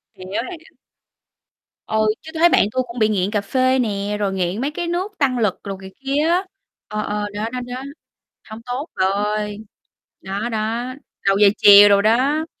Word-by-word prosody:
Hiểu, 185 - -11 0.3
hiểu. 330 -1 -12 1.1
Ừ, 220 0 +1
chứ 315 - -11
tôi 320 - -4
thấy 345 - +7
bạn 205 - +4
tui 255 +2 +1
cũng 235 +1 -8
bị 215 -1 +3
nghiện 200 -2 0
cà 210 -2 0
phê 255 +5 +1
nè, 205 -3 -1
rồi 200 -2 -1
nghiện 185 +3 -2
mấy 280 +3 -1
cái 345 +3 -4
nước 360 +4 -2
tăng 260 -4 +1
lực 210 -5 0
đồ 195 -1 -5
này 190 0 -10
kia 280 +3 0
á, 360 +3 +2 0.4
ờ, 210 0 -3
ờ, 210 0 -2
đó, 215 +2 -2
đó, 250 - -3
đó, 260 - -6 0.7
hông 220 +1 -9
tốt 255 +6 -4
bà 190 -1 +1
ơi. 210 +1 -1 0.6
Đó, 200 +5 -4
đó, 230 +3 -2 0.3
đầu 195 0 +4
giờ 210 - +6
chiều 205 0 +9
đồ 200 0 +5
đó. 265 +9 +2
220 Hz, 195 wpm, -20 LUFS, 205-260 Hz, 1.1 s, chiều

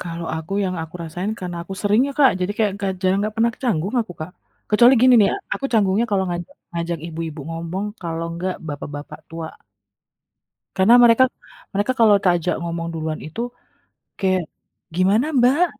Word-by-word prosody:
Kalau 170 -1 -5
aku, 160 +3 -7
yang 185 -1 -2
aku 160 +1 -10
rasain, 175 +5 -4
karena 180 -1 -5
aku 195 - -6
sering 210 +2 +3
ya, - - -4
Kak. 275 -3 +7
Jadi 180 +3 0
kayak 215 -2 +3
nggak 195 -1 -1
jang 185 +1 +2
nggak 210 +1 -2
pernah 230 +1 +3
ke - - -32
canggung 200 -1 0
aku, 220 -5 -5
Kak. 155 +3 -5 0.4
Kecuali 240 +4 +7
gini 255 0 +7
nih, 200 - +5
ak 400 - -5 0.2
aku 275 - -8
canggungnya 210 0 +3
kalau 195 -2 +2
ngajak 175 -1 -5 0.2
ngajak 170 0 -2
ibu-ibu 165 -2 -5
ngomong, 165 +4 -4 0.2
kalau 165 -1 -3
enggak 180 +2 -3
bapak-bapak 145 0 -7
tua. 165 -1 -6 1.3
Karena 190 +5 +5
mereka 235 +2 +6 0.5
mereka 205 +5 +1
kalau 220 -3 +7
tak 185 - +5
ajak 175 +1 -1
ngomong 170 0 -3
duluan 160 -1 -3
itu, 155 +9 -5 0.8
kayak, 185 -1 +1 0.5
"Gimana 200 +8 +3
Mbak?" 260 +8 +5
185 Hz, 180 wpm, -21 LUFS, 165-215 Hz, 1.3 s, Kak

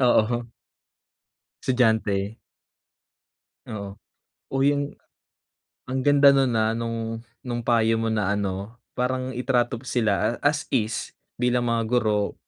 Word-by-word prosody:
Oo. 120 -1 +3 1.2
Estudyante. 110 -4 +1 1.3
Oo. 100 -2 -6 0.6
Uy, 135 +2 +3
ang 145 - 0 1.0
ang 130 +1 -2
ganda 140 +1 +6
no'n, 135 -2 +3
ah, 110 0 +2
no'ng 115 0 -3 0.2
no'ng 120 -2 -3
payo 115 -1 +3
mo 115 - 0
na 105 -3 +1
ano, 100 +3 -3 0.2
parang 130 +1 -1
itrato 125 -1 +1
mo 125 - -12
sila 115 -1 0
as 150 +1 +1
is, 110 -3 -1 0.2
bilang 125 0 +1
mga 115 -1 +1
guro. 110 -3 +1
115 Hz, 115 wpm, -25 LUFS, 110-125 Hz, 1.3 s, ganda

